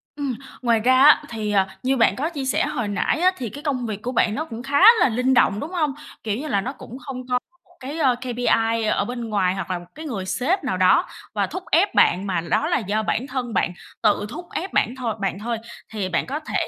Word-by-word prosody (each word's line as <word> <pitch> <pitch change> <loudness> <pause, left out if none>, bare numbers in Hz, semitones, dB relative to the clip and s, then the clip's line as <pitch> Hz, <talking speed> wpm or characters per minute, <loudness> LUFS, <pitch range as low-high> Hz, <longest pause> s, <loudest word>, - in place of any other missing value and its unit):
Ừm. 285 -3 -2 0.3
Ngoài 235 -2 +3
ra 255 +4 +4
á, 300 +1 +7
thì, 215 -2 -3
ờ, 195 -2 +3 0.2
như 265 +1 +1
bạn 230 - +4
có 300 +5 -1
chia 285 -6 -5
sẻ 265 - +1
hồi 240 -7 -2
nãy 205 +8 0
á 365 +2 +4
thì 240 -3 -4
cái 285 +8 -10
công 265 -5 -1
việc 210 -2 -4
của 245 - -3
bạn 220 -3 +2
nó 310 - -2
cũng 235 -5 -8
khá 280 +2 +1 0.2
là - - +4
linh 250 +3 +1
động, 210 -5 +3
đúng 300 +8 -5
hông? 310 -6 0 0.3
Kiểu 215 -1 -1
như 305 - -5
là 205 -8 +1
nó 260 +6 -4
cũng 255 -2 -10
không 255 -2 -7
có 250 -1 +1 0.3
một - - -26
cái, 280 +5 -6
ơ, 265 -5 +3
KPI 230 -2 +1
ở 200 - +1
bên 240 0 -5
ngoài 190 -3 +1
hoặc 190 -1 -4
là 180 - -1
một 175 - -12
cái 315 +2 -8
người 210 -10 -4
sếp 285 - 0
nào 190 -9 -1
đó 185 - +4 0.3
và - - 0
thúc 370 - -6
ép 370 +6 +3
bạn 185 +3 +4
mà 180 -3 0
đó 170 - 0
là - - +2
do 215 +1 -1
bản 245 +4 -1
thân 255 -3 -4
bạn 180 - +1 0.3
tự 205 0 +3
thúc 345 +9 -7
ép 375 +3 -4
bản 240 - +1
thôi 245 -4 -2
bạn 195 -1 -2
thôi. 230 +2 -2 0.4
Thì 200 -4 -2
bạn 175 - 0
có 280 +3 -3
thể 310 - -2
245 Hz, 260 wpm, -22 LUFS, 210-275 Hz, 0.4 s, á